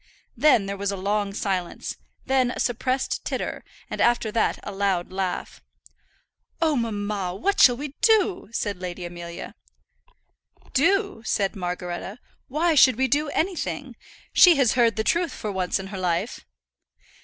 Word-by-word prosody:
Then 245 -5 +4
there 200 0 -4
was 200 0 -1
a 200 - -4
long 200 +1 -1
silence, 190 -3 -3 0.3
then 260 -2 +2
a - - -5
suppressed 255 +2 -1
titter, - - -4 0.2
and - - -4
after 235 -2 +2
that 225 0 +1
a - - -5
loud 195 -3 -1
laugh. 185 -1 -3 1.0
"Oh, 315 -2 +2
mamma, 205 -5 -2
what 395 - 0
shall 245 -2 +7
we 290 +2 -5
do?" 420 - +3
said 205 -4 -3
Lady 180 -1 -5
Amelia. 175 0 -8 1.2
"Do!" 390 - +2
said 200 -2 0
Margaretta; 180 +2 -4 0.3
"why 320 +5 +1
should 265 -4 +6
we 265 +3 +1
do 295 +2 +1
anything? 350 +4 -2 0.4
She 355 -2 +8
has 270 -5 +3
heard 235 -3 +3
the 220 - -1
truth 340 +3 +1
for 210 - -4
once 185 -2 0
in 195 - -6
her 190 - -4
life." 180 +5 -2
215 Hz, 150 wpm, -24 LUFS, 190-275 Hz, 1.2 s, She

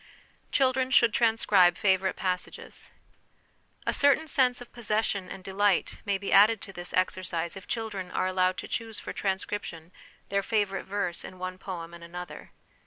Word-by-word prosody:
Children 260 -1 +2
should 235 -3 +5
Transcribe 210 -7 +4
favourite 190 -1 +2
Pass 180 -1 -1
ages. - - -9 1.0
A - - +1
certain 285 +3 +4
sense 255 -4 +3
of 245 - -12
possession 215 -4 -1
and 190 - -8
delight 195 0 +1
may 200 -1 +1
be 200 0 -3
added 215 +2 +7
to 195 - -9
this 175 -1 -5
exercise 185 -2 -1
if 190 - -10
children 210 -5 -3
are 180 - -1
allowed 185 0 +1
to - - -5
choose 225 -2 -4
for - - -6
transcription 190 -4 -3 0.4
their 200 0 +1
favourite 205 -2 -1
verse 190 -3 -2
in 185 - -9
one 185 0 -5
poem 170 -4 -6
and 170 0 -11
another. 175 +1 -8
195 Hz, 165 wpm, -28 LUFS, 185-220 Hz, 1.0 s, added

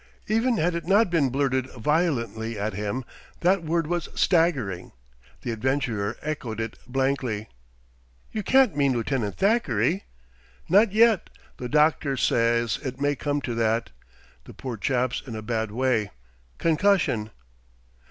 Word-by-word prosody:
Even 225 +3 +1
had 175 +2 +1
it 170 -1 -4
not 200 0 +4
been 150 -6 +2
blurted 130 -1 0
violently 115 -5 -1
at 105 +1 -2
him, 105 +6 -3 0.4
that 180 +1 +3
word 165 +1 0
was 175 +1 -2
staggering. 140 - +1 0.5
The 120 - -2
adventurer 115 -3 -1
echoed 130 -8 -4
it 115 0 -3
blankly. 130 -4 -1 0.8
"You 215 - -2
can't 260 - +4
mean 140 -2 +2
Lieutenant 115 -3 -2
Thackeray 190 - +1 0.3
?" - - -31
"Not 200 +4 +5
yet, 220 -2 +4 0.3
though 125 - -5
doctor 150 -1 +2
says 115 -1 +2
it 130 0 -5
may 145 +1 +1
come 145 +1 -2
to 125 - -3
that; 115 0 0 0.5
the - - -12
poor 130 -3 -5
chap's 125 +3 0
in 120 -4 -7
a 110 - -6
bad 110 -1 -1
way 115 -2 0 0.5
concussion." 165 - +2
130 Hz, 140 wpm, -25 LUFS, 115-165 Hz, 0.8 s, Not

